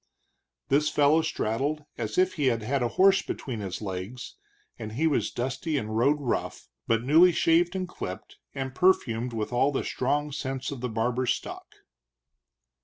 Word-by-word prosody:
This 150 +2 +3
fellow 150 +2 +4
straddled 150 0 -2
as 110 -3 -4
if 185 0 +3
he 150 -6 0
had 125 +3 0
a 120 - +2
horse 195 +1 +6
between 125 - -5
his 100 +1 -5
legs, 95 +5 -6 0.4
and 110 -2 -6
he 150 +8 0
was 155 -3 +1
dusty 130 +5 -2
and 110 -4 -3
road 140 +6 +3
rough, 130 -5 -3 0.2
but 115 0 +1
newly 160 +7 +6
shaved 170 +2 +2
and 185 -1 -2
clipped, 95 - -8 0.2
and 135 -1 -4
perfumed 125 -9 +2
with 110 +1 -4
all 135 +4 +3
the 135 - -1
strong 145 +3 -1
scents 135 -1 -4
of 135 -4 -6
the 125 - -2
barber's 120 +3 0
stock. - - -8
130 Hz, 165 wpm, -27 LUFS, 115-150 Hz, 0.4 s, horse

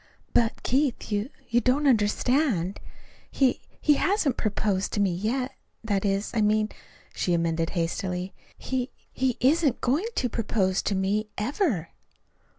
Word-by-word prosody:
"But, 230 -1 +2
Keith, 265 -3 0
you 205 +4 0 0.2
you 240 0 +2
don't 265 +4 +2
understand. 220 - +2 0.5
He 265 -3 +2 0.2
he 300 - +4
hasn't 350 - +1
proposed 205 -2 -1
to - - 0
me 195 -3 +2
yet. 245 +8 -1 0.3
That 205 -3 0
is, 195 +1 0
I 225 - +1
mean," 215 0 +2 0.4
she 175 - 0
amended 165 -1 0
hastily, 180 +2 -2 0.2
"he 260 0 -2 0.2
he 260 -2 0
isn't 285 +1 +3
going 290 - +1
to 250 - +1
propose 200 -5 0
to 200 - +1
me 205 +3 0
ever." 220 - 0
215 Hz, 140 wpm, -26 LUFS, 195-260 Hz, 0.5 s, he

